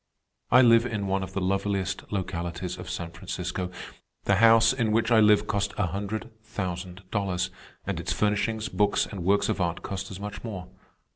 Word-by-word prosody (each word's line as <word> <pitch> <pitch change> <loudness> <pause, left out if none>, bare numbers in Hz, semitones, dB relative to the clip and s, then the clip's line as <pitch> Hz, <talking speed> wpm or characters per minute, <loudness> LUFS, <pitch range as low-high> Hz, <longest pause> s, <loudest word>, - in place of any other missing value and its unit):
"I 125 +3 +7
live 115 0 +6
in 105 -4 -2
one 95 0 0
of 95 - -6
the - - -1
loveliest 100 +1 -1
localities 85 -2 -3
of - - -7
San 85 -1 -4
Francisco. 90 +1 -4 0.5
The 100 - +3
house 115 +2 +6
in 115 -4 0
which 115 +2 +2
I 115 - +7
live 105 -1 +5
cost 100 -1 -1
a 105 - +2
hundred 100 +6 -4
thousand 95 -3 -5
dollars, 95 -3 -1 0.3
and - - -2
its - - -3
furnishings, 105 +2 0
books, 105 -5 +2
and 95 -5 -6
works 100 +3 +3
of - - -1
art 85 -1 -1
cost 100 0 -4
as 95 - -8
much 105 0 -6
more. 95 -6 -6
100 Hz, 185 wpm, -27 LUFS, 95-110 Hz, 0.5 s, I